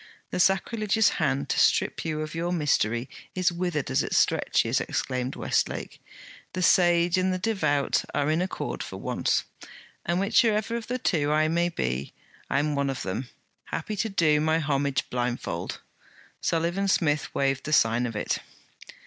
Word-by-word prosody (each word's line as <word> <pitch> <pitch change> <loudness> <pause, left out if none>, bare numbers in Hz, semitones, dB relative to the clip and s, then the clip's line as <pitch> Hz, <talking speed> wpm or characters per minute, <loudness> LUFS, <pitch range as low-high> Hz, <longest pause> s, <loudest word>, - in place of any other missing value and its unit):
'The - - -2
sacrilegious 210 +3 +2
hand 140 -2 0
to - - 0
strip - - +2
you 155 -1 -2
of 155 0 -5
your 170 +1 -2
mystery 130 -7 +1 0.3
is 185 -1 +2
withered 170 -6 -2
as 130 +2 +3
it - - -2
stretches,' - - +2
exclaimed 125 +1 -2
Westlake. - - -2 0.5
'The 185 - -2
sage 175 0 +4
and 185 0 +1
the 185 - 0
devout 160 -9 +1
are 145 +1 +1
in 160 +2 +1
accord 185 - -3
for - - -6
once.' - - 0 0.6
'And 175 +1 0
whichever 215 +2 +2
of 235 -1 -4
the 250 - -1
two 150 -11 0
I 155 +1 +3
may 170 +1 +1
be, 65 - -3 0.4
I'm 145 +2 +1
one 140 -1 0
of 135 - -3
them, 115 +7 -4 0.4
happy 215 - -4
to 225 - 0
do 155 -6 +3
my 160 +1 +2
homage 140 -3 0
blindfold!' 120 -8 -3 0.6
Sullivan 170 +4 0
Smith 155 -6 +1
waved 135 -1 0
the 155 - -3
sign 120 -3 +3
of 115 - -6
it. 105 - -1
155 Hz, 160 wpm, -26 LUFS, 135-185 Hz, 0.6 s, sage